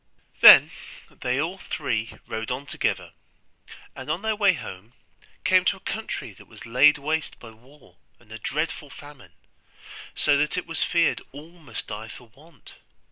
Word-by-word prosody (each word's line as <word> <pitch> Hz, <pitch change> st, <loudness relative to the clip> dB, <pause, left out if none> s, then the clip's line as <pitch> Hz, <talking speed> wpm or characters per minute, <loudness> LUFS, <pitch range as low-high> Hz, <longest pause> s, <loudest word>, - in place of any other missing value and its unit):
Then -, -, +10 dB, 0.4 s
they 125 Hz, +2 st, -2 dB
all 175 Hz, +6 st, -3 dB
three 115 Hz, -9 st, -3 dB
rode 110 Hz, 0 st, -5 dB
on 130 Hz, +3 st, -4 dB
together, -, -, -2 dB, 0.8 s
and 130 Hz, +2 st, -9 dB
on 165 Hz, +6 st, -2 dB
their 220 Hz, -1 st, 0 dB
way 205 Hz, -2 st, +4 dB
home 105 Hz, -, -9 dB, 0.5 s
came -, -, +4 dB
to -, -, +1 dB
a -, -, -21 dB
country -, -, -5 dB
that -, -, -17 dB
was -, -, -13 dB
laid 140 Hz, +6 st, +5 dB
waste 155 Hz, +2 st, -3 dB
by 115 Hz, -, -13 dB
war 130 Hz, +6 st, -21 dB, 0.2 s
and 110 Hz, -2 st, -22 dB
a 110 Hz, -, -8 dB
dreadful 150 Hz, +1 st, -3 dB
famine, 145 Hz, -2 st, -14 dB, 0.8 s
so 145 Hz, -, +2 dB
that 150 Hz, +4 st, 0 dB
it 180 Hz, -, -3 dB
was 165 Hz, -, -4 dB
feared 170 Hz, -2 st, +1 dB
all 150 Hz, +4 st, -11 dB
must 155 Hz, -10 st, -9 dB
die 110 Hz, +2 st, -7 dB
for 120 Hz, +1 st, -13 dB
want. 145 Hz, +2 st, -18 dB
145 Hz, 165 wpm, -24 LUFS, 120-160 Hz, 0.8 s, Then